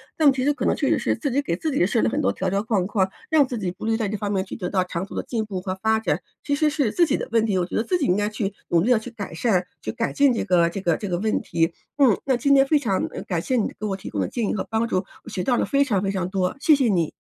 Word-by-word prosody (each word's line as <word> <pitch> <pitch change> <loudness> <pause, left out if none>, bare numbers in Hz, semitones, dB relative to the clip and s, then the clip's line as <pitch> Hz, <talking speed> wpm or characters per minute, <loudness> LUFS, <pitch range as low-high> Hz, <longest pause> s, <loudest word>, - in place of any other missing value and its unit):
但 300 -3 +5
其 260 -1 -2
实 290 - +3
可 - - -3
能 - - +2
确 - - -1
实 - - +2
是 - - 0
自 285 -5 -3
己 280 - +1
给 170 - -2
自 310 - -2
己 265 - +2
设 - - +1
了 110 - +3
很 - - 0
多 100 - +2
条 185 - -2
条 200 +1 +1
框 210 -5 0
框， 195 -2 +1 0.2
让 295 -4 +5
自 245 - -4
己 185 -4 -2
不 185 - -8
利 225 - +1
于 - - +1
在 220 -3 -1
这 215 - -3
方 205 0 -3
面 190 -1 0
去 - - -7
得 180 -4 -4
到 185 -2 +1
长 180 -1 -4
足 - - -10
的 - - -2
进 225 -3 -2
步 195 -3 -5
和 185 0 -3
发 220 0 +2
展， - - 0 0.2
其 285 - -1
实 305 +1 +2
是 285 -7 0
自 340 +4 +3
己 - - +1
的 - - -5
问 225 -1 +3
题， 195 -3 +1
我 180 - +1
觉 - - -6
得 - - +2
自 360 - 0
己 295 - -1
应 180 - +3
该 205 +1 0
去 210 -2 -3
努 170 -1 +3
力 240 - +2
地 235 - +5
去 245 - -8
改 205 -7 -7
善， 185 0 +1 0.2
去 - - -3
改 230 0 -2
进 280 -2 +4
这 230 - -1
个 170 -2 +3
这 195 - -5
个 170 -4 +2
这 205 - -5
个 175 - 0
问 215 +4 0
题。 165 0 0 0.2
嗯， 255 -8 +5
那 265 -2 +2
今 280 +4 +2
天 270 -1 +6
非 305 - +4
常 215 -10 0
嗯， - - -5
感 175 -4 -1
谢 255 - -1
你 225 - +1
给 215 - -3
我 195 -2 -1
提 190 - -8
供 100 - -4
的 95 - 0
建 230 -4 -2
议 - - 0
和 205 - -2
帮 225 +1 +1
助， 185 - 0 0.3
我 - - -10
学 205 -4 -3
到 250 - +3
了 - - +1
非 280 0 +1
常 205 -9 0
非 195 - 0
常 185 -2 -2
多， 185 -1 0
谢 310 - +5
谢 265 -4 +2
你。 170 -6 +1
215 Hz, 370 characters per minute, -23 LUFS, 185-255 Hz, 0.3 s, 天